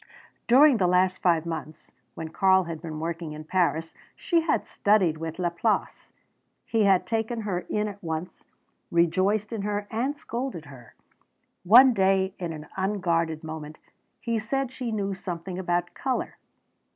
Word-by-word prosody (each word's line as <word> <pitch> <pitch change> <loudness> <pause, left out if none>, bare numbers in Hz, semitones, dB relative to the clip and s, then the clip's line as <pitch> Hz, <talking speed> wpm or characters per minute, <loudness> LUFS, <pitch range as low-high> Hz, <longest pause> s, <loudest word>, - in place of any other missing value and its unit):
During 270 +2 +6
the 185 -4 +2
last 180 +1 +2
five 170 -3 +2
months, 160 -2 -7 0.2
when 160 -1 -6
Karl 190 +3 +3
had 165 -2 -6
been 160 -3 -6
working 165 -1 -4
in 155 0 -8
Paris, 165 -1 0 0.2
she 340 -3 +1
had 320 - 0
studied 195 -6 +2
with 160 0 -5
Laplace. 180 +5 -1 0.5
He 225 -2 +1
had 190 -2 +4
taken 225 +1 -2
her 185 -5 -3
in 210 0 0
at 205 -1 -9
once, 160 +2 -5 0.5
rejoiced 190 +6 +1
in 220 - -3
her 205 0 -2
and 255 +6 -1
scolded 235 - -5
her. 130 -5 -14 0.7
One 245 +7 +8
day 190 -2 +2
in 175 -3 -3
an 155 -1 -8
unguarded 170 -5 -1
moment 155 -1 -7 0.4
he 230 -2 -1
said 260 +4 -2
she 255 -3 -4
knew 200 -2 -2
something 180 0 -6
about 175 -1 -1
colour. 260 -1 -3
185 Hz, 150 wpm, -26 LUFS, 165-215 Hz, 0.7 s, One